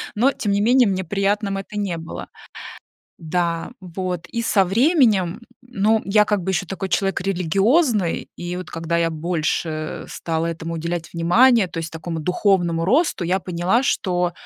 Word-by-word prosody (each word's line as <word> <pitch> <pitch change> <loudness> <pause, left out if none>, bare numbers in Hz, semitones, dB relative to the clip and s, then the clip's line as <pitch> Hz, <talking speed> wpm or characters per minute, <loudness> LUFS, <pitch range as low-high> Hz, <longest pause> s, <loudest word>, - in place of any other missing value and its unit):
но 255 +6 +3
тем 210 -5 -2
не 200 0 +2
менее 245 +2 +4
мне 190 -1 -1
приятным 200 +2 -1
это 195 +2 -7
не 190 -5 -2
было. 165 0 -8 0.9
Да, 170 0 -2
вот, 180 -1 -4
и 235 - -3
со 200 -4 +3
временем, 220 - +2 0.2
ну, 225 -3 +1
я 210 +1 +4
как 205 -2 0
бы 190 - -2
ещё 185 0 -1
такой 195 +2 -4
человек 195 +1 0
религиозный, 195 - +1
и 175 +1 -5
вот 180 -1 -7
когда 165 0 -2
я 165 0 +1
больше, 160 0 -1
э, 155 0 -5
стала 165 0 -2
этому 165 0 -4
уделять 170 0 -4
внимания, 195 +5 +4
то - - -12
есть 165 0 -5
такому 165 0 -5
духовному 175 -1 +1
росту, 280 - +2
я 185 +3 +1
поняла, 180 +6 0
что, 180 -6 0
185 Hz, 165 wpm, -21 LUFS, 170-205 Hz, 0.9 s, менее